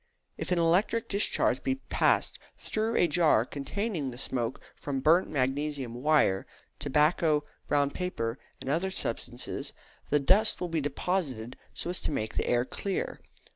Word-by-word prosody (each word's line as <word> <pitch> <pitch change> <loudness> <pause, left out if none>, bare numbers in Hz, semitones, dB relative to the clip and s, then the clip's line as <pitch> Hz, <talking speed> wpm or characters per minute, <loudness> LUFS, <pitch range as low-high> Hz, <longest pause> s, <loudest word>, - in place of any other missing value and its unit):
If - - -5
an 180 - +3
electric 180 +7 +2
discharge 200 +1 +1
be 265 - 0
passed 270 - +1 0.2
through 220 +1 -1
a 175 - +4
jar 155 -8 +4
containing 150 - -3
the 120 - -8
smoke 125 -2 -2 0.2
from 140 -2 -3
burnt 165 +7 +4
magnesium 135 -2 -1
wire, 125 -7 +2 0.3
tobacco, 150 +2 +2 0.2
brown 145 -1 +2
paper, 130 -11 -3 0.2
and - - -9
other 165 +7 +1
substances, 190 - -3 0.4
the 150 - +3
dust 195 +10 +4
will 180 - -3
be 165 -2 0
deposited 140 -5 -2 0.2
so 175 - -3
as 180 - -2
to - - -1
make 110 -6 -2
the - - -1
air 120 0 +2
clear. 195 +8 -3
150 Hz, 150 wpm, -29 LUFS, 135-180 Hz, 0.4 s, a